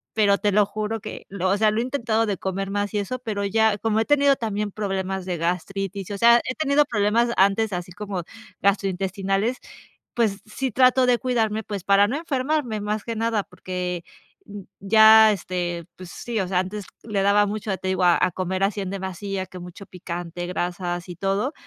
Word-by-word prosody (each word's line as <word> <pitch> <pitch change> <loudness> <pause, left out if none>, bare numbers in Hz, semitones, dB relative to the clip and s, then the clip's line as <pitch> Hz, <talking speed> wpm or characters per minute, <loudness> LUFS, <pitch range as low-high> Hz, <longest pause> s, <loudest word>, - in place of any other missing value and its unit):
pero 205 -2 +4
te 205 - +1
lo 205 +1 +4
juro 215 +2 -3
que, - - -8
lo 190 -1 -1
o 195 - +2
sea, 215 +1 +4
lo 215 - -1
he - - +1
intentado 230 -4 0
de 205 -3 -2
comer 195 +1 -3
más 205 0 -1
y - - 0
eso, 255 +6 -4
pero 210 -4 -3
ya 220 +1 +2
como 220 +1 0
he - - 0
tenido 285 -1 +4
también 210 -3 -3
problemas 190 -2 -3
de 180 -2 -3
gastritis, 195 +3 -3
o 200 - -3
sea, 235 +3 +6
he 255 - -3
tenido 295 -1 +3
problemas 230 -1 +1
antes, 200 +3 +3
así 180 -1 -5
como 195 -2 -5 0.4
gastrointestinales, 195 +3 0 0.6
pues 215 -4 0
sí 255 +4 -3
trato 255 +2 +4
de 245 -1 +3
cuidarme, 225 -4 0
pues 200 -4 -5
para 200 +1 +4
no 255 +7 -2
enfermarme 275 -6 -1
más 210 0 -2
que 230 - -4
nada 225 -2 0
porque 180 -1 -5 0.8
ya, 220 +2 +7
este 175 -3 -3
pues 185 -1 -11
sí, 230 +4 -4
o 190 - -1
sea, 180 -1 +1
antes 190 +2 -4 0.2
le 210 -3 -1
daba 200 +1 +4
mucho, 205 -1 -3
te 190 - -4
digo 190 -1 0
a 175 -1 +5
a 185 - +2
comer 185 +1 -2
así 200 +1 0
en 190 - -4
demasía, 190 0 -4
que 185 0 -11
mucho 180 +3 -10
picante, 175 -1 -6
grasas 175 0 -3
y 175 - -7
todo, 195 - -1
200 Hz, 195 wpm, -23 LUFS, 185-220 Hz, 0.8 s, ya